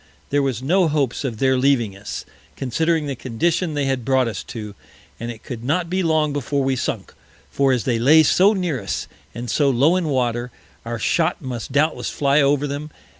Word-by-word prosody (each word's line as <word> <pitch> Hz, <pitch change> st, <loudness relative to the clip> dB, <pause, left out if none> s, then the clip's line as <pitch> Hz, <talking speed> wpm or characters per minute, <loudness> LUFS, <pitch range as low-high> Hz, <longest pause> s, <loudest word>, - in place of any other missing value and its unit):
There 145 Hz, 0 st, +3 dB
was 130 Hz, -3 st, -2 dB
no 180 Hz, +5 st, +3 dB
Hopes 145 Hz, -5 st, 0 dB
of 120 Hz, -5 st, -3 dB
their 130 Hz, +1 st, +2 dB
leaving 125 Hz, -7 st, +2 dB
us, 100 Hz, +1 st, -7 dB, 0.3 s
considering 160 Hz, +5 st, 0 dB
the 140 Hz, -2 st, -3 dB
condition 155 Hz, +7 st, -1 dB
they 145 Hz, -1 st, 0 dB
had 135 Hz, -2 st, -1 dB
brought 130 Hz, 0 st, +2 dB
us 110 Hz, -5 st, -4 dB
to, 105 Hz, -3 st, -7 dB, 0.5 s
and 115 Hz, -, -5 dB
it 115 Hz, -2 st, -8 dB
could 120 Hz, -3 st, -7 dB
not 165 Hz, +6 st, -1 dB
be 190 Hz, +1 st, +1 dB
long 155 Hz, -3 st, +1 dB
before 140 Hz, 0 st, -1 dB
we 135 Hz, 0 st, +1 dB
sunk: 125 Hz, -, -3 dB, 0.4 s
for 140 Hz, -1 st, +2 dB
as 125 Hz, -3 st, +1 dB
they 120 Hz, -3 st, 0 dB
lay 155 Hz, +7 st, +6 dB
so 190 Hz, +7 st, +4 dB
near 175 Hz, -, -2 dB
us, 95 Hz, -, -3 dB, 0.3 s
and 120 Hz, +1 st, -5 dB
so 140 Hz, +5 st, +2 dB
low 140 Hz, +7 st, +3 dB
in 180 Hz, -3 st, 0 dB
Water, 125 Hz, -3 st, 0 dB, 0.4 s
our 115 Hz, 0 st, -3 dB
Shot 160 Hz, +9 st, 0 dB
must 125 Hz, -2 st, -5 dB
doubtless 150 Hz, +4 st, +1 dB
fly 140 Hz, +1 st, +2 dB
over 140 Hz, +1 st, +2 dB
them. 145 Hz, +2 st, -4 dB
135 Hz, 200 wpm, -21 LUFS, 120-155 Hz, 0.5 s, lay